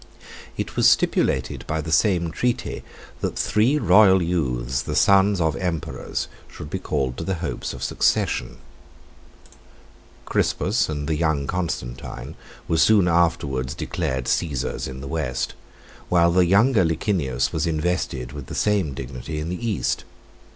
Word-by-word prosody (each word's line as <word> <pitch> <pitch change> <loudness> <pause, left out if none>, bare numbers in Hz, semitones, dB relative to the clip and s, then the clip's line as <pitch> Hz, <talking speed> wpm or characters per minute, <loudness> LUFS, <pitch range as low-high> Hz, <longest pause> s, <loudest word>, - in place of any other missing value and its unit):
It - - -4
was - - +6
stipulated 65 -1 +1
by 80 - -1
the 80 +1 -4
same 85 -4 +2
treaty, 120 +8 -2 0.4
that - - -3
three 120 +8 +2
royal 95 -5 +6
youths, 65 -7 -1
the - - -4
sons 100 0 +4
of 80 -3 +1
emperors, 85 -5 -3 0.2
should 75 - -10
be - - -2
called 65 -2 -2
to - - -4
the 95 +2 -1
hopes 85 -1 -4
of - - -9
the - - -1
succession. - - 0 1.7
Crispus 105 +1 +1
and 75 -2 -3
the 80 - 0
young 75 -3 0
Constantine 70 -8 -4 0.3
were 80 - +1
soon 100 +1 +5
afterwards 75 -6 +1
declared 65 -2 -3
Cæsars 70 -3 -1
in 65 0 -7
the 70 - -7
West, 75 -5 -2 0.6
while 85 -1 +4
the 90 0 +4
younger 105 +3 +4
Licinius 80 - 0
was - - 0
invested 80 -6 -2
with 70 -3 -8
the - - -7
same 100 -10 +1
dignity 65 +4 -6
in 75 +2 -4
the 105 +7 -3
East. 85 - -1
80 Hz, 145 wpm, -23 LUFS, 70-90 Hz, 1.7 s, was